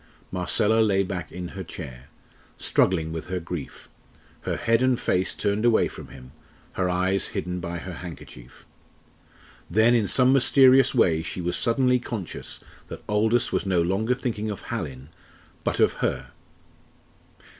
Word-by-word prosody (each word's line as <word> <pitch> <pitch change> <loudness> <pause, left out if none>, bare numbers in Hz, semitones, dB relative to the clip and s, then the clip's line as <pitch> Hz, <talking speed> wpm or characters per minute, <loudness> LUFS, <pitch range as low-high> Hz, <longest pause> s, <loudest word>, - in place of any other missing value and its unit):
Marcella 105 +4 +1
lay 100 -3 +3
back 90 -3 -5
in 90 +1 -6
her 95 -1 -7
chair, 65 -7 -9 0.5
struggling 80 -4 +1
with 80 -1 -5
her 90 0 -2
grief, 85 -3 -7 0.6
her - - -1
head 115 +1 +2
and 130 -2 +2
face 90 +1 0
turned 105 +1 -1
away 120 -2 +4
from - - -10
him, 65 -1 -13 0.4
her 90 -1 0
eyes 95 +2 +1
hidden 90 +1 -3
by 85 -1 -4
her 90 +1 -7
handkerchief. 80 -8 -11 1.0
Then 110 +6 +4
in 115 -4 +2
some 130 +5 +4
mysterious 135 0 +5
way 85 -9 +3
she 80 - -6
was 90 0 -1
suddenly 125 +1 +2
conscious 110 -7 -6 0.2
that - - -9
Aldous 110 +3 +2
was - - -1
no 95 -2 +2
longer 100 +8 +1
thinking 110 -4 -3
of 105 - -5
Hallin, 65 +2 -5 0.5
but - - -1
of - - +4
her. - - -2
95 Hz, 150 wpm, -25 LUFS, 85-115 Hz, 1.0 s, mysterious